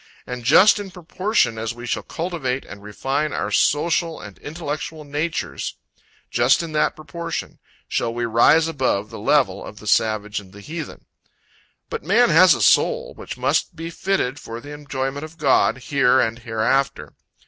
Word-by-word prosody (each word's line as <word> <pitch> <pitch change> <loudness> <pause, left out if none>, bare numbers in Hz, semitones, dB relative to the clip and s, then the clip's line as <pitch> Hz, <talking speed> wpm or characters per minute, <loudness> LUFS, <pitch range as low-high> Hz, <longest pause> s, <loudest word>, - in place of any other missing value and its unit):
And 125 -1 -6
just 185 - +6
in 200 -1 -6
proportion, 180 - 0
as 115 +1 -3
we 120 0 -8
shall - - -1
cultivate, 160 -7 -3
and 100 - -11
refine 135 +8 -2
our 100 - -2
social 165 - +1
and 100 -2 -11
intellectual 155 0 -5
natures, 150 +3 -3 0.5
just 120 +7 +3
in 165 - -6
that 155 - +1
proportion, 165 +2 -6 0.3
shall 115 - -1
we 120 0 -2
rise 120 +8 +4
above 130 -9 -1
the - - -8
level - - +2
of - - -10
the - - -12
savage 105 -1 +1
and 95 -2 -15
the 100 - -12
heathen. 155 +5 -7 0.8
But - - -5
man 220 +8 +4
has 180 +4 +7
a - - -1
soul, - - +3
which - - -8
must - - 0
be 165 +1 -6
fitted 165 -9 -1
for 115 +1 -7
the 145 +4 -10
enjoyment 140 -1 -4
of 155 +1 -10
God, 140 -4 +3
here 130 -1 +2
and 115 -1 0
hereafter. 120 +4 -1
145 Hz, 165 wpm, -22 LUFS, 120-165 Hz, 0.8 s, has